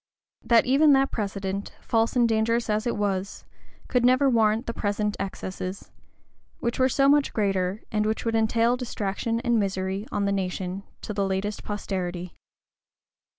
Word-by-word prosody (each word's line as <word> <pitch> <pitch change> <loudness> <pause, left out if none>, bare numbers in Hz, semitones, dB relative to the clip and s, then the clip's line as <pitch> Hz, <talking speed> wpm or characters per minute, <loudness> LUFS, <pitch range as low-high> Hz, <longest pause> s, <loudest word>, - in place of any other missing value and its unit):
That 230 -1 +4
even 285 +3 +5
that 270 0 +3
precedent, 200 -1 -3
false 225 +1 0
and 240 -2 +4
dangerous 230 +1 +1
as 215 +2 0
it 235 - -1
was, 200 -1 -2 0.4
could 250 -2 +1
never 255 +3 +4
warrant 225 0 +2
the 230 - -3
present 210 0 -1
excesses; 190 -1 -5 0.7
which 235 +1 -2
were 260 0 +4
so 275 +2 +3
much 290 0 +3
greater, 195 -1 0
and 210 -1 +1
which 220 +2 -2
would 230 - 0
entail 225 +2 +2
distraction 230 -2 -2
and 240 -2 +2
misery 195 +1 -2
on 205 -1 0
the 200 - +1
nation, 185 -1 -2 0.2
to 210 - -4
the 200 -1 0
latest 195 +2 -2
posterity. 180 -4 -4
210 Hz, 155 wpm, -26 LUFS, 195-235 Hz, 0.7 s, even